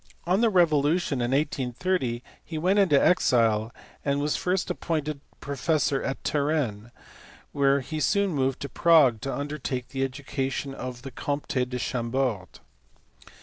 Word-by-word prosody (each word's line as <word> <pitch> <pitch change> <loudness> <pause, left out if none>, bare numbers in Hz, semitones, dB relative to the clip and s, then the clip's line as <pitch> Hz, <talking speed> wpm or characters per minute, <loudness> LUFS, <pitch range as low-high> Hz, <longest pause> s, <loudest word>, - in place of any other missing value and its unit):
On 185 +5 +2
the 230 - +4
revolution 155 - +2
in 120 - 0
1830 130 -1 -1 0.2
he 160 - -6
went 185 +6 +2
into 175 -8 +5
exile, 115 -10 +3 0.3
and 140 0 0
was 145 +1 0
first 180 0 -1
appointed 155 -3 -3 0.2
professor 140 0 0
at 135 - -4
Turin, 140 -8 -1 0.6
whence 140 -1 +1
he 155 - -2
soon 200 +4 +2
moved 135 -3 0
to 140 - -3
Prague 145 -9 +4
to 135 - -3
undertake 140 -3 -4
the 135 -1 -2
education 135 0 -3
of 125 -2 -7
the 135 - -7
Comte 145 +3 -4 0.2
de 125 - -3
Chambord. 120 -4 -1
140 Hz, 140 wpm, -26 LUFS, 130-155 Hz, 0.6 s, into